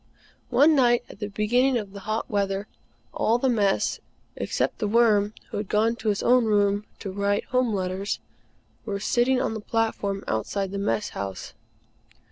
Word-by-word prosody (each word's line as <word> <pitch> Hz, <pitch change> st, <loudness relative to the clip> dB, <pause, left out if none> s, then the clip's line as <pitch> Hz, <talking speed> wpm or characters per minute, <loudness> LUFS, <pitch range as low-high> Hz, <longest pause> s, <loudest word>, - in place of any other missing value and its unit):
One 310 Hz, +3 st, +5 dB
night, 240 Hz, -3 st, +4 dB
at -, -, -12 dB
the 205 Hz, -, -3 dB
beginning 240 Hz, +6 st, +2 dB
of 205 Hz, -4 st, -5 dB
the 200 Hz, -, -7 dB
hot 215 Hz, +3 st, -3 dB
weather, 200 Hz, -1 st, -1 dB, 0.5 s
all 230 Hz, -, +2 dB
the 260 Hz, +2 st, +1 dB
Mess, 205 Hz, -4 st, +1 dB, 0.4 s
except -, -, -2 dB
The 215 Hz, -, 0 dB
Worm, 215 Hz, -2 st, +3 dB, 0.2 s
who -, -, -3 dB
had 205 Hz, -1 st, -4 dB
gone 225 Hz, +2 st, +2 dB
to 220 Hz, -3 st, -1 dB
his 205 Hz, -, 0 dB
own 245 Hz, -1 st, +4 dB
room 205 Hz, -1 st, +2 dB, 0.2 s
to 195 Hz, -, -4 dB
write 200 Hz, +1 st, 0 dB
Home 250 Hz, -2 st, +2 dB
letters, 190 Hz, 0 st, -2 dB, 0.6 s
were 200 Hz, -2 st, -3 dB
sitting 245 Hz, +5 st, +2 dB
on -, -, -1 dB
the 220 Hz, -, -5 dB
platform 210 Hz, -3 st, -1 dB
outside 190 Hz, -, -2 dB
the 200 Hz, -, -3 dB
Mess 210 Hz, +1 st, -1 dB
House. 95 Hz, -1 st, -6 dB
210 Hz, 170 wpm, -25 LUFS, 200-235 Hz, 0.6 s, One